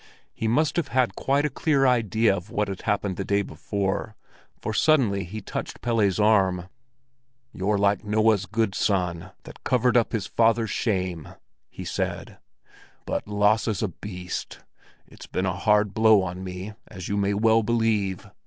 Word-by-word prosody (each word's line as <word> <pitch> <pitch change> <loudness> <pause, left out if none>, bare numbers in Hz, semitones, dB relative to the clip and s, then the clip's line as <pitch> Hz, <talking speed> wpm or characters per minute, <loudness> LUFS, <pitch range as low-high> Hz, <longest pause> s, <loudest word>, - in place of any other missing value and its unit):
He 110 - -3
must 145 +9 +1
have 170 - 0
had 125 0 +1
quite 140 +2 +1
a - - +1
clear 140 -1 +1
idea 115 -4 +3
of 95 +1 -7
what 105 0 -1
had 95 - -5
happened 100 -3 -1
the 100 - -2
day 100 +1 +1
before, 100 +2 -3 0.4
for 110 - -4
suddenly 115 -8 +3
he 105 +5 -7
touched - - -6
Pelle's 110 -5 +1
arm. 95 -4 +2 0.8
"You're 100 +3 0
like 100 -1 +2
Noah's 105 -1 +2
good 110 0 0
son, 90 -4 -1
that - - -13
covered 125 0 +2
up 115 -3 +3
his 110 -5 -2
father's 115 -1 +2
shame!" 90 - -2 0.4
he - - -9
said; - - -4 0.7
"but - - -3
Lasse's 105 0 +1
a 105 - 0
beast. 90 0 -7 0.4
It's - - -13
been 90 - -2
a 90 - 0
hard 105 +1 +2
blow 110 -3 +5
on 90 0 -5
me, 95 +3 -6
as 95 -2 -8
you 100 - -1
may 100 0 +1
well 110 +2 +4
believe! 110 -4 0
105 Hz, 160 wpm, -25 LUFS, 95-115 Hz, 0.8 s, blow